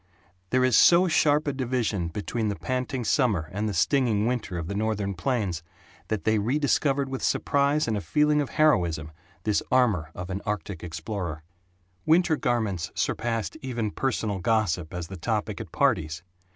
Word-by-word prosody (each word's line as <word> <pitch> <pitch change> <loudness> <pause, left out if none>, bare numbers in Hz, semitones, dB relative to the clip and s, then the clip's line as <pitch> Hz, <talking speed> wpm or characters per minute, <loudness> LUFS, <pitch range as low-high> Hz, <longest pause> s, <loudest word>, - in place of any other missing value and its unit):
There 130 0 +2
is 130 - +3
so 175 +2 +6
sharp 150 -2 +3
a 145 - 0
division 120 -8 -1
between 110 +5 -3
the 100 - -1
panting 130 +1 -3
summer 105 - +1
and 105 +3 -2
the - - -3
stinging 110 - +2
winter 115 -7 -2
of 85 - -3
the 100 - -3
Northern 105 -1 -1
plains 95 -4 -1 0.5
that 110 -2 -2
they 110 -1 +2
rediscovered 140 +3 +1
with 135 -1 -5
surprise 140 +1 +1
and 110 - 0
a 105 - -2
feeling 150 +3 +2
of 140 - -3
heroism 85 - +2 0.3
this 105 -2 +1
armor 110 -11 +2
of 90 +1 -6
an 95 +2 -3
Artic 100 -3 -4
explorer. 85 -1 -5 0.6
Winter 165 0 +4
garments 110 - -1
surpassed 115 +3 -2
even 120 -5 -2
personal 110 -6 -1
gossip 90 -6 0
as 90 -1 -4
the 95 +2 -8
topic 105 +2 -2
at - - -9
parties. 90 - 0
110 Hz, 165 wpm, -26 LUFS, 95-130 Hz, 0.6 s, so